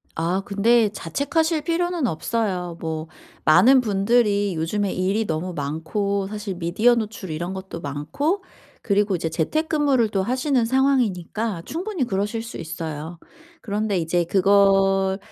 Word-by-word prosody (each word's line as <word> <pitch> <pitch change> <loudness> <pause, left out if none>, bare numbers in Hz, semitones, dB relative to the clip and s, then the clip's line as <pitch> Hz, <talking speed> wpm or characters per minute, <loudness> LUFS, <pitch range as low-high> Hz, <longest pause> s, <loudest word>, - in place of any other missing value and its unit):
아. 170 +4 0
근데 220 +2 +3
자책하실 300 - -1
필요는 340 -3 0
없어요. 180 -1 -2
뭐 160 -1 -4 0.4
많은 255 +11 +6
분들이 205 -2 +2
요즘에 190 +5 -1
일이 195 +4 0
너무 170 +1 -3
많고 170 +7 -2
사실 210 -1 -5
미디어 190 +8 +2
노출 215 -6 -4
이런 175 +4 -3
것도 190 -3 -7
많고 165 - -2 0.4
그리고 200 -1 +1
이제 165 -1 -2
재택근무를 280 - +1
또 195 -2 0
하시는 255 +2 +1
상황이니까 225 -7 0
충분히 360 -1 -3
그러실 210 +2 -2
수 230 - -8
있어요. 160 0 -6 0.4
그런데 210 -2 -1
이제 170 +1 +1
그걸 195 0 +3
200 Hz, 300 characters per minute, -23 LUFS, 175-235 Hz, 0.4 s, 많은